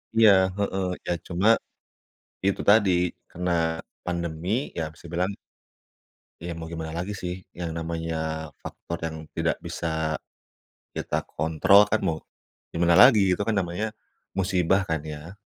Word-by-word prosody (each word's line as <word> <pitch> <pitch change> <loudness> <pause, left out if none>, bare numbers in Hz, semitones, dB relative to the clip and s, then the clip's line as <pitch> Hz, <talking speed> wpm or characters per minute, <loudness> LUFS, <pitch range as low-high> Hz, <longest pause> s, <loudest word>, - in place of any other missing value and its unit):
Iya 110 -2 +8 0.3
heeh, 100 -1 -1 0.2
ya - - -1 0.2
cuma 90 +4 +1 1.0
itu 100 - +1
tadi 105 -2 +6 0.4
karena 90 +1 -2 0.5
pandemi 85 0 -3 0.3
ya 85 - 0
bisa - - -19
dibilang 90 +4 -1 1.1
ya 85 - -3
mau 80 0 -7
gimana 80 -1 -5
lagi 95 +4 -3
sih 90 0 -5
yang 85 -2 -5
namanya 80 0 -3 0.5
faktor 85 - -6
yang 80 -1 -3 0.2
tidak - - 0
bisa 80 -1 -2 0.8
kita - - -2
kontrol 80 +6 +4
kan 110 +2 0
mau 85 -5 0 0.6
gimana 85 +1 +4
lagi, 120 -3 +8 0.2
itu - - -2
kan 115 - +1
namanya 100 +5 -3 0.4
musibah 95 0 +2
kan 80 -2 0
ya 75 +6 -8
85 Hz, 130 wpm, -26 LUFS, 80-100 Hz, 1.1 s, Iya